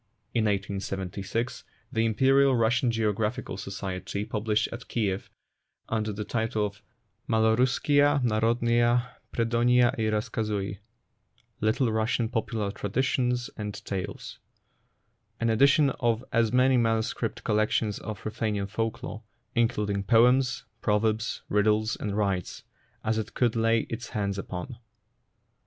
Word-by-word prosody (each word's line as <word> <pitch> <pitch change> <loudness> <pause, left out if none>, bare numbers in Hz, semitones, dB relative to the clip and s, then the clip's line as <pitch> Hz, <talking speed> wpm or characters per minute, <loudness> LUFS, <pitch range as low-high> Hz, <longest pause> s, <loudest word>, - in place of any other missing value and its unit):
In 115 -2 +2
1876 100 +2 -2 0.3
the 115 0 +1
Imperial 135 +4 +4
Russian 120 +2 +2
Geographical 110 +1 -1
Society 95 +1 -4
published 110 -1 0
at 120 +1 -8
Kiev, 100 -4 -2 0.6
under 110 -1 -1
the 105 +1 -5
title 110 -2 0
of 100 0 -7 0.5
Maloruss 110 +3 +3
kiya 145 0 +3
Narodnuiya 120 +2 +2 0.2
Predonyia 120 +1 +3
i 110 -1 +1
Razkazui 105 -2 -2 0.4
(" - - -39
Little 115 +2 +2
Russian 110 +1 0
Popular 110 -3 -2
Traditions 125 +3 -1
and 105 -2 -5
Tales 95 -2 -5 0.5
"), - - -46
an 115 0 +1
edition 140 +4 +5
of 120 0 +1
as 115 -3 +3
many 130 +1 +4
manuscript 115 -2 0
collections 110 0 +1
of 110 -3 -7
Ruthenian 110 -2 -1
folk 115 +2 -2
lore 110 - -6 0.3
(in 120 -1 +4
cluding 100 -4 -2
poems, 125 +3 +4 0.2
proverbs, 110 +1 0
riddles, 105 +2 +2
and 105 -1 -3
rites) 95 -4 -1 0.4
as 110 0 0
it 110 0 -6
could 120 -3 +2
lay 115 0 +3
its 120 +2 -6
hands 100 -3 -2
upon. 100 +6 -6
110 Hz, 125 wpm, -27 LUFS, 105-120 Hz, 0.6 s, edition